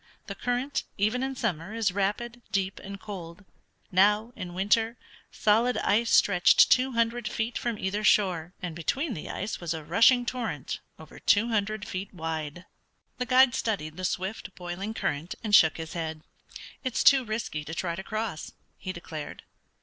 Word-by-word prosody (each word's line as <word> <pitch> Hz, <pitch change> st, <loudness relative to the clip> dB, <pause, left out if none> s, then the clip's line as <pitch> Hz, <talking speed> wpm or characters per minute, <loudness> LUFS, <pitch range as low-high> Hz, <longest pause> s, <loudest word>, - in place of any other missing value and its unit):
The 200 Hz, -, -5 dB
current, 245 Hz, +6 st, -2 dB
even 215 Hz, +5 st, +1 dB
in 265 Hz, 0 st, -2 dB
summer, 200 Hz, -4 st, -2 dB
is 220 Hz, -4 st, +1 dB
rapid, 210 Hz, +5 st, -2 dB
deep, 195 Hz, -1 st, -1 dB
and 200 Hz, 0 st, -8 dB
cold. 190 Hz, -2 st, -8 dB, 0.5 s
Now, 210 Hz, +5 st, +3 dB
in 175 Hz, -1 st, -7 dB
winter, 225 Hz, +5 st, +2 dB, 0.3 s
solid 225 Hz, +3 st, +2 dB
ice 230 Hz, +3 st, +2 dB
stretched 180 Hz, -3 st, +5 dB
two 255 Hz, +1 st, +4 dB
hundred 230 Hz, 0 st, 0 dB
feet 230 Hz, +1 st, -2 dB
from 235 Hz, -3 st, -2 dB
either 205 Hz, +2 st, -2 dB
shore, 180 Hz, -6 st, +3 dB
and 175 Hz, -3 st, -4 dB
between 270 Hz, -, -1 dB
the 155 Hz, -, -7 dB
ice 210 Hz, -, -4 dB
was 170 Hz, -1 st, -2 dB
a 160 Hz, -, -6 dB
rushing 230 Hz, -, +5 dB
torrent 225 Hz, -, -3 dB, 0.2 s
over 160 Hz, -, -13 dB
two 225 Hz, +3 st, +3 dB
hundred 215 Hz, -1 st, -1 dB
feet 185 Hz, +2 st, -5 dB
wide. 160 Hz, 0 st, -4 dB, 0.5 s
The 250 Hz, -, -2 dB
guide 255 Hz, 0 st, +6 dB
studied 155 Hz, -9 st, -2 dB
the 185 Hz, -, -7 dB
swift, 185 Hz, +1 st, -3 dB
boiling 185 Hz, +5 st, -5 dB
current, 150 Hz, -1 st, -2 dB
and 210 Hz, -2 st, -3 dB
shook 160 Hz, -7 st, +7 dB
his 160 Hz, -1 st, -6 dB
head. 160 Hz, -2 st, -4 dB, 0.6 s
"It's 255 Hz, -3 st, 0 dB
too 270 Hz, -2 st, +7 dB
risky 215 Hz, -9 st, -3 dB
to 160 Hz, +2 st, -6 dB
try 170 Hz, -1 st, -2 dB
to 190 Hz, -, -5 dB
cross," 215 Hz, -5 st, -4 dB, 0.3 s
he 185 Hz, -, -4 dB
declared. 160 Hz, -4 st, -8 dB
205 Hz, 165 wpm, -28 LUFS, 175-230 Hz, 0.6 s, shook